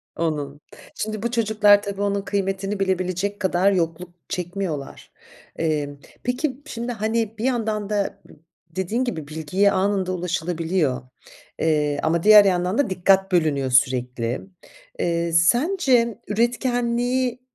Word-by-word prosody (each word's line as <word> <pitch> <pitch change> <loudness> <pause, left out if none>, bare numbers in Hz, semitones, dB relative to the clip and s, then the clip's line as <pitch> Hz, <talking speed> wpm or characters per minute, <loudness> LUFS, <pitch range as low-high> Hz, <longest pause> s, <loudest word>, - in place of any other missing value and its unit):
Onun. 150 -3 -3 0.3
Şimdi 215 0 -4
bu 235 - -1
çocuklar 215 -3 +4
tabii 200 -1 -5
onun 200 0 0
kıymetini 195 0 -2
bilebilecek 190 +1 -1
kadar 190 +1 +2
yokluk 175 -1 -1 0.2
çekmiyorlar. 180 -5 -5 0.4
Emm, 150 -3 -2 0.3
peki, 255 +2 -2
şimdi 240 -4 -5
hani, 220 0 -2
bir 225 - -3
yandan 220 -5 -1
da 205 -2 -1 0.5
dediğin 190 +9 -2
gibi 160 - -4
bilgiye 160 +6 +1
anında 190 -1 0
ulaşılabiliyor 170 -3 -1 1.1
ama, 160 +2 +2
eee, 165 - -6
diğer 210 -1 +8
yandan 180 +1 +1
da 285 - +2
dikkat 190 +1 +2
bölünüyor 150 -7 +1
sürekli. 125 -2 +1 0.6
Eee, 170 0 0
sence 240 - +3
üretkenliği, 245 +2 0
195 Hz, 115 wpm, -23 LUFS, 170-220 Hz, 1.1 s, diğer